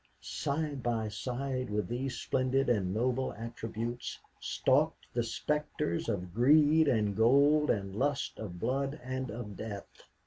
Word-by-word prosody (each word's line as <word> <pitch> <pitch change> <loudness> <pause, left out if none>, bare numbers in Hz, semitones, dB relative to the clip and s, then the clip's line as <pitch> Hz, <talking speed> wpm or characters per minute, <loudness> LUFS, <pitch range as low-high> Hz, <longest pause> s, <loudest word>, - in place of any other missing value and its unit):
side 145 -1 -2
by 115 -3 0
side 130 +3 -3
with 105 0 -1
these 125 +3 -3
splendid 130 +1 +1
and 100 -6 +2
noble 125 +5 0
attributes 115 +1 -5 0.2
stalked 150 +5 +1
the 120 - +1
specters 115 - -1
of 90 -3 -3
greed 150 +6 +5
and 105 -6 +2
gold 140 +7 +5
and 100 -2 0
lust 140 +4 -1
of 90 -5 -6
blood 135 - -1
and 130 0 -3
of 105 -2 -6
death. 105 -2 -7
125 Hz, 135 wpm, -32 LUFS, 110-140 Hz, 0.2 s, greed